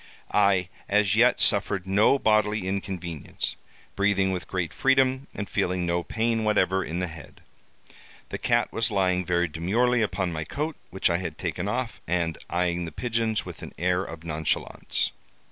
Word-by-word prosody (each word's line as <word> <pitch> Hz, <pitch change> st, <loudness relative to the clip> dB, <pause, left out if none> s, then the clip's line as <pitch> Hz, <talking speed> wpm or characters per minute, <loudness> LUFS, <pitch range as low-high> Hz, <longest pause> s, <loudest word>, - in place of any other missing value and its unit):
I 100 Hz, -3 st, +3 dB, 0.2 s
as 100 Hz, -1 st, +3 dB
yet -, -, +4 dB
suffered 95 Hz, -2 st, +3 dB
no 100 Hz, +8 st, +4 dB
bodily 105 Hz, -4 st, +2 dB
inconvenience, 90 Hz, -5 st, -3 dB, 0.4 s
breathing 100 Hz, -1 st, +2 dB
with 90 Hz, -2 st, -4 dB
great 90 Hz, -4 st, -2 dB
freedom, 135 Hz, 0 st, +2 dB
and 100 Hz, -, -4 dB
feeling 90 Hz, -3 st, 0 dB
no 85 Hz, 0 st, +1 dB
pain 115 Hz, +4 st, 0 dB
whatever 95 Hz, -3 st, +2 dB
in 85 Hz, -, -4 dB
the 90 Hz, -, 0 dB
head. 80 Hz, -1 st, -11 dB, 0.9 s
The -, -, -4 dB
cat -, -, +1 dB
was 115 Hz, +1 st, +1 dB
lying 95 Hz, -3 st, +1 dB
very 90 Hz, 0 st, +1 dB
demurely 115 Hz, +10 st, +1 dB
upon 95 Hz, -4 st, -1 dB
my 80 Hz, -1 st, -3 dB
coat, 150 Hz, -, -3 dB
which 95 Hz, -1 st, +1 dB
I 85 Hz, -, +2 dB
had 85 Hz, -5 st, -5 dB
taken 90 Hz, +3 st, -3 dB
off, 120 Hz, +2 st, -3 dB
and 85 Hz, -2 st, 0 dB
eyeing 85 Hz, 0 st, 0 dB
the 80 Hz, -, -6 dB
pigeons 115 Hz, -2 st, -1 dB
with 90 Hz, -4 st, -9 dB
an -, -, -8 dB
air 90 Hz, +1 st, +1 dB
of 80 Hz, -3 st, -8 dB
nonchalance. 80 Hz, -2 st, -1 dB
95 Hz, 160 wpm, -26 LUFS, 85-110 Hz, 0.9 s, yet